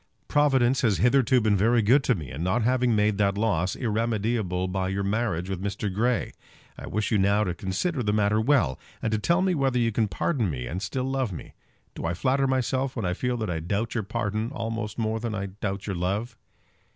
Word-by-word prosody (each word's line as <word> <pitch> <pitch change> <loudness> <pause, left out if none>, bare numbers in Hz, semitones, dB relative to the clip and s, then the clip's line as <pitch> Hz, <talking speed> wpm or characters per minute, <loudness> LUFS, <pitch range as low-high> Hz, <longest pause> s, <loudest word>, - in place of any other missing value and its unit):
Providence 135 -4 +3
has 110 -6 +2
hitherto 130 0 +4
been 110 -3 +2
very 115 +4 +3
good 130 +7 +4
to - - +3
me 75 -8 -7
in 70 +4 -6
not 95 +7 +1
having 125 -1 +2
made 105 -1 +2
that 100 -1 +2
loss 100 -4 0
irremediable 110 -5 -1
by 95 0 -2
your 100 +1 -1
marriage 100 -4 -1
with 95 -2 -4
Mr. 100 0 -3
Grey. 120 +4 0 0.4
I - - -9
wish 105 0 -2
you 105 - +3
now 100 +2 +3
to 90 -4 -1
consider 110 - -2
the 105 -3 0
matter 105 +1 +2
well, 115 - +2 0.2
and 110 - 0
to 110 - +1
tell 170 - +2
me 190 -1 +2
whether 135 -5 +1
you 115 -1 +2
can 110 0 +1
pardon 115 - -1
me 65 -5 -4
and 85 +10 -4
still 125 +6 -2
love 130 -4 -1
me. 85 - -8 0.4
Do - - -7
I 85 +2 -1
flatter 135 +8 +1
myself 130 0 0
when 115 -6 -2
I 90 - 0
feel 125 +5 -1
that 110 -4 -3
I 80 - -2
doubt 100 +7 -2
your 115 - 0
pardon 110 +2 -2
almost 115 -4 -4
more 110 -1 -1
than 115 -2 -3
I 100 -1 -2 0.2
doubt 100 -2 -3
your 95 - -3
love? 100 +7 -2
110 Hz, 220 wpm, -26 LUFS, 95-125 Hz, 0.4 s, hitherto